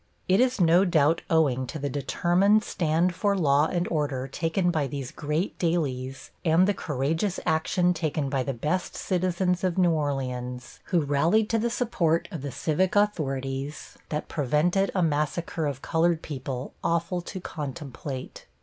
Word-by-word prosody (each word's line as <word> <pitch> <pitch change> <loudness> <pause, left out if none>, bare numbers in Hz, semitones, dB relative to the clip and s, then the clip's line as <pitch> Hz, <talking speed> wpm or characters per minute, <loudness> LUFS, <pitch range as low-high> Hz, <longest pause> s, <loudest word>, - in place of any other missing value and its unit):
It 190 +2 +4
is 255 -1 +2
no 175 +1 +5
doubt 165 -3 +3
owing 135 -6 +2
to 155 - -5
the 140 -1 -2
determined 175 - +2
stand 170 +2 +1
for 200 +2 +1
law 145 -3 +3
and 175 +1 -1
order 145 -5 -1
taken 165 +5 0
by 155 -4 0
these 135 -1 -5
great 150 +6 -2
dailies 135 -6 -2
and 170 +3 +4
the 205 - +3
courageous 160 +6 -1
action 175 +2 +2
taken 155 -3 -1
by 135 -1 0
the 135 - -2
best 155 +9 -2
citizens 180 0 0
of 185 -1 0
New 180 -2 +4
Orleans, 125 -5 -3
who 175 -4 +2
rallied 160 +10 +2
to 225 - +2
the 235 +2 0
support 175 -9 0
of 165 -7 -5
the 140 0 -4
civic 175 - 0
authorities, 140 -8 -1
that 150 0 -3
prevented 165 +7 +1
a 185 - +2
massacre 155 +1 -1
of 140 -2 -5
colored 165 0 +1
people 135 -3 -5
awful 170 +2 0
to 185 +2 -7
contemplate. 140 -4 -6
160 Hz, 160 wpm, -26 LUFS, 140-180 Hz, -, no